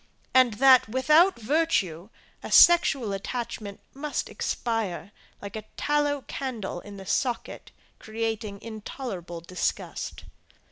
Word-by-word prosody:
And, 255 -4 +5
that, 260 0 +6
without 305 - +4
virtue, 215 - 0 0.3
a - - -8
sexual 275 -11 +6
attachment 210 0 -5
must 290 +2 -3
expire, 210 -6 -3 0.3
like 200 - -7
a 220 - -4 0.2
tallow 290 -1 +1
candle 235 -10 -5
in 200 +2 -11
the 195 - -9
socket, 245 +4 -2 0.3
creating 220 -2 -4
intolerable 210 -6 -7
disgust. 180 +2 -4
225 Hz, 105 wpm, -26 LUFS, 200-270 Hz, 0.3 s, that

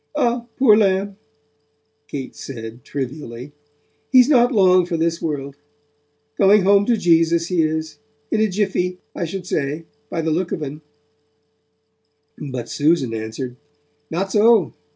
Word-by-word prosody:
'Ah, 235 0 0
poor 255 -6 +6
lamb,' 195 -1 +1 0.9
Kate 135 -3 -6
said 115 -2 -8
trivially, 135 -2 -6 0.6
'he's 255 -1 +7
not 245 -3 +4
long 185 -5 +5
for 175 -1 -3
this 165 +1 -1
world; 140 -3 -4 0.8
going 200 0 +5
home 200 +1 +4
to 235 -2 +3
Jesus, 165 -2 +2
he 180 -3 +2
is, 155 -1 -2 0.3
in 220 - +1
a 220 - +2
jiffy, 185 -2 -1 0.2
I 170 - -2
should 180 +2 -6
say 150 -1 -2 0.2
by 165 - -2
the 160 0 -1
look 175 +3 -1
of 155 - -3
'un.' 150 +2 -7 1.5
But 130 -5 -6
Susan 145 -5 +1
answered: 115 +3 -5 0.5
'Not 190 +4 -2
so. 215 -2 +4
170 Hz, 135 wpm, -20 LUFS, 145-200 Hz, 1.5 s, he's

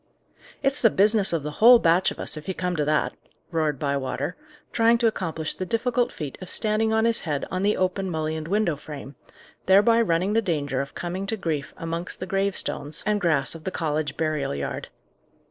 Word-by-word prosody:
"It's 275 +1 +2
the 225 - +6
business 205 0 +3
of 165 -4 -1
the 150 - -4
whole 240 +2 +10
batch 175 -3 +3
of - - -8
us, - - -2
if 155 - -9
you 190 - -2
come 180 -1 -2
to 150 - 0
that!" 150 0 +1 0.4
roared 155 -4 0
Bywater, 140 -1 -2 0.4
trying 230 0 +4
to 235 - 0
accomplish 165 -8 -1
the - - -5
difficult 240 +5 0
feat 145 -4 -7
of 185 - -8
standing 220 0 +1
on 220 0 +2
his 230 0 +2
head 145 -3 -2
on 185 - -1
the 205 +2 +2
open 185 +1 0
mullioned 155 -1 -3
window 195 -3 +1
frame, 145 -1 -9 0.5
thereby 210 +5 +5
running 185 0 +1
the 225 - +3
danger 145 -8 -1
of 140 - -8
coming 185 +3 -4
to 220 - -2
grief 160 -7 -3
amongst 165 +2 -4
the 185 - -4
gravestones 190 -6 0
and 210 -1 +1
grass 155 -6 +1
of 165 -1 -10
the - - -2
College 155 -4 -2
burial 155 - -1
yard. 70 0 -4
175 Hz, 195 wpm, -25 LUFS, 155-210 Hz, 0.5 s, whole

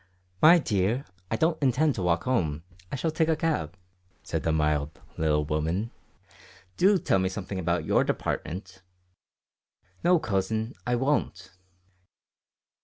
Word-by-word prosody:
"My 165 +3 +8
dear, 110 - 0 0.2
I - - 0
don't 160 +7 +1
intend 140 +3 +2
to 100 - -4
walk 85 -2 +1
home; 80 - 0 0.3
I - - -2
shall 160 +4 -1
take 160 0 +1
a 160 - +3
cab," 95 - -2 0.5
said - - -3
the 80 - 0
mild 75 -1 0 0.2
little 75 -1 +1
woman. 80 +9 -1 0.8
"Do 195 - +4
tell 95 - +1
me 95 0 +1
something 95 0 -5
about 85 0 -1
your - - +3
department." 95 +2 -4 1.2
"No, 180 0 +5
cousin, 110 - -1
I 125 - +2
won't." 120 -8 -1
100 Hz, 135 wpm, -27 LUFS, 85-140 Hz, 1.2 s, My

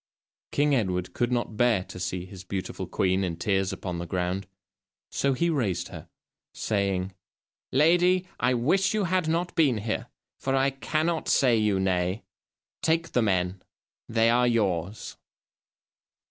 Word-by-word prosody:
King 145 0 +2
Edward 90 -8 0
could 120 0 0
not 120 -3 -1
bear 115 -6 +3
to 90 - -10
see 90 0 -3
his 95 -1 -11
beautiful 95 0 -4
queen 95 0 +1
in 85 -3 -2
tears 95 -2 0
upon 90 -2 -4
the 85 - -5
ground, 90 +2 -2 0.6
so 140 0 +1
he 150 +7 +1
raised 100 - -1
her, - - -10 0.5
saying: 100 -3 -1 0.6
"Lady, 175 +6 +4
I 125 +1 +2
wish 190 - +2
you 215 - +1
had 180 -2 +1
not 170 +2 0
been 140 -8 +3
here, 105 +1 -3 0.3
for 135 0 0
I 135 +1 +3
cannot 155 +4 -1
say 125 -3 +4
you 105 -3 +2
nay. 95 +1 0 0.6
Take 165 +1 +1
the 125 - +2
men, 90 -3 0 0.5
they 115 0 +3
are 125 +1 +3
yours." 100 -4 -1
115 Hz, 145 wpm, -27 LUFS, 95-140 Hz, 0.6 s, Lady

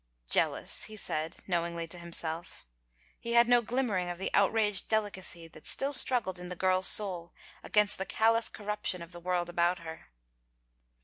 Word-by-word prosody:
"Jealous," - - +2
he 215 - -10
said 160 -4 -1
knowingly 170 -2 -3
to 175 +2 -6
himself. 170 -1 -4 0.5
He 235 - -5
had 235 0 +5
no 245 0 +4
glimmering 225 -7 -2
of 175 - -5
the 190 - -4
outraged 205 -1 +2
deli 220 -2 0
cacy 170 -3 -6
that 155 - -16
still 275 +1 +3
struggled 235 -9 +2
in 180 0 -9
the 180 - -6
girl's 185 +1 +2
soul 180 -5 +3 0.3
against 210 -2 +1
the 190 - -3
callous 225 +1 +2
corruption 210 -4 -4
of 170 - -13
the 175 - -10
world 175 0 -2
about 175 +1 0
her. 160 -2 -10
185 Hz, 170 wpm, -29 LUFS, 170-215 Hz, 0.5 s, had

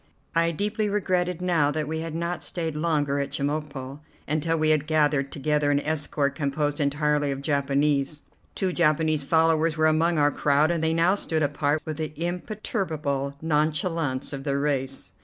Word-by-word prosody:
I 165 0 +3
deeply 210 +5 -1
regretted 180 -3 0
now 165 -5 +2
that 150 0 -2
we 160 +1 -2
had 165 -1 -5
not 170 +1 -2
stayed 165 -3 -3
longer 150 -3 0
at 140 0 -2
Chemulpo 140 -1 -4 0.3
until 160 +2 0
we 155 0 +3
had 150 -1 +1
gathered 145 -3 +2
together 150 +1 0
an 145 0 +3
escort 145 -2 -1
composed 145 0 -1
entirely 145 0 +1
of 135 0 -3
Japanese. 140 0 +1 0.3
Two 185 -2 -1
Japanese 155 -2 +2
followers 160 +1 +2
were 155 - +3
among 160 +2 +3
our 145 0 +4
crowd, 145 +3 +2
and 165 -2 -1
they 160 0 +2
now 170 +3 +4
stood 160 -6 -1
apart 145 +1 0
with 155 -2 -4
the 155 -1 -4
imperturbable 165 - -3
nonchalance 150 -2 0
of 135 -1 -5
their 140 -1 0
race. 135 -2 -2
155 Hz, 165 wpm, -25 LUFS, 145-165 Hz, 0.3 s, our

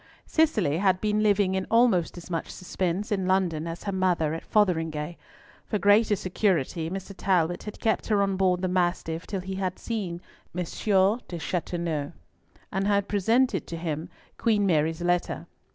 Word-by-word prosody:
Cicely 215 - +2
had 190 -2 +3
been 210 +1 +1
living 205 -2 +3
in 190 0 -1
almost 230 -8 +3
as 175 +1 -10
much 165 - -2
suspense 185 +4 -3
in 190 -3 0
London 175 -4 +1
as 165 +1 -6
her 200 - -2
mother 180 -5 +1
at 165 - -4
Fotheringhay. 165 -6 0 0.5
For 210 - 0
greater 205 +1 +4
security 175 -5 0
Mr. 195 +2 -6
Talbot 175 -3 +1
had 210 - -7
kept 220 - 0
her 205 -3 +3
on 195 -1 0
board 185 -1 +1
the - - +2
Mastiff 175 -2 -1
till 195 -3 -3
he 190 +1 -5
had 190 -1 -2
seen 195 -7 -4 0.4
M. 180 - 0
d'Aubepine 195 +1 +1
Chateauneuf, 170 -3 -2 0.6
and 200 0 +1
presented 225 +6 +2
to 170 - -5
him 160 -1 -4 0.3
Queen 215 -3 +2
Mary's 160 -1 +1
letter. 175 0 0
185 Hz, 160 wpm, -27 LUFS, 170-205 Hz, 0.6 s, greater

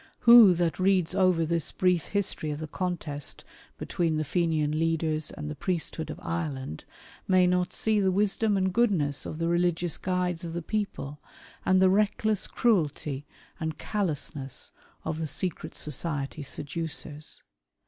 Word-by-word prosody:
Who 235 -6 +9
that 170 0 0
reads 185 -2 +2
over 185 -4 +3
this 165 0 -1
brief 180 -3 +2
history 195 -6 0
of 150 - -3
the 155 - -5
contest 155 -4 -4 0.3
between 165 -3 -1
the 155 - 0
Fenian 155 -2 0
leaders 160 -1 0
and 150 0 -6
the 150 - -3
priesthood 160 0 -3
of - - -6
Ireland, 145 - -4 0.4
may 185 -1 +5
not 180 0 +1
see 220 +2 +1
the 190 -2 +3
wisdom 205 +2 +2
and 190 -1 +1
goodness 175 - +1
of 155 - -5
the 165 0 -1
religious 175 -1 +1
guides 180 -1 -1
of 165 -1 -5
the 170 -1 -4
people, 160 -8 -3 0.4
and 185 0 +4
the 190 - +6
reckless 210 +1 +2
cruelty 150 - 0 0.3
and 160 -1 -3
callousness 150 - -2 0.3
of 160 0 -2
the 160 - -2
secret 180 +2 -4
society 150 -1 -3
seducers 150 +1 -5
170 Hz, 150 wpm, -28 LUFS, 155-185 Hz, 0.4 s, Who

